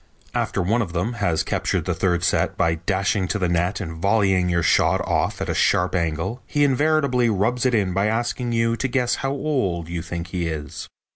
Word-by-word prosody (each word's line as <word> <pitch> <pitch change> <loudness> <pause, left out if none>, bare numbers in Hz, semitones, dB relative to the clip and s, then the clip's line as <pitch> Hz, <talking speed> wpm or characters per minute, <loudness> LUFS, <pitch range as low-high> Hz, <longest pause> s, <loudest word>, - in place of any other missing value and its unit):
After - - -1
one 115 +7 +1
of 90 -7 -4
them 90 +8 -1
has 100 -8 0
captured 90 -5 -1
the 90 - 0
third 85 0 0
set - - +1
by 80 - +2
dashing 95 +3 -1
to 105 - -1
the 90 -3 0
net 85 +3 0
and 80 -4 -6
volleying 95 -3 +2
your 85 -1 +1
shot - - +3
off - - -1
at - - -2
a - - -1
sharp 90 +1 +2
angle 85 +7 -2
he 145 - +1
invariably 140 -3 +2
rubs 115 +5 +1
it 125 - +1
in 95 -4 +1
by 100 +3 +1
asking 120 +2 -1
you 115 0 +1
to 135 - -1
guess 125 -2 0
how 135 - -1
old 130 - -1
you 85 -1 -3
think 85 +1 -6
he 85 -1 -2
is. 75 -2 -6
95 Hz, 210 wpm, -22 LUFS, 85-120 Hz, -, shot